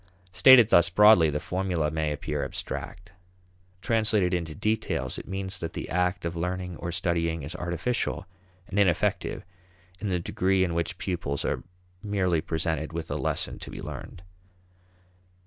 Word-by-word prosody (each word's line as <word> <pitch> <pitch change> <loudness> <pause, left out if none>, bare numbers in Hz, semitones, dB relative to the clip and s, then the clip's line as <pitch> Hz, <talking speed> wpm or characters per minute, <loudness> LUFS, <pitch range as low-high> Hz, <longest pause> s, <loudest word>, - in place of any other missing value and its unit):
Stated 120 +2 +8
thus 85 -4 +6
broadly, 105 -3 +6
the 75 0 -1
formula 90 -5 -1
may 80 -1 -1
appear 75 0 -3
abstract. 85 +6 -5 0.7
Translated 110 -5 +2
into 85 -3 -2
details, 110 0 -1
it - - -11
means 95 0 -4
that 85 - -5
the - - -5
act 90 0 0
of 85 0 -3
learning 90 +1 -3
or 85 - -4
studying 85 -2 -1
is 80 +6 -6
artificial 90 +6 -2 0.4
and 100 - -1
ineffective 90 -3 +1 0.5
in 105 - -3
the 90 -1 0
degree 95 +2 +1
in 90 -2 -1
which 85 0 -2
pupils 85 -7 -3
are - - -1 0.4
merely 95 -5 0
presented 80 -1 -2
with 85 0 -5
a - - -1
lesson - - -2
to - - -8
be - - -8
learned. 90 - -8
90 Hz, 150 wpm, -27 LUFS, 80-95 Hz, 0.7 s, Stated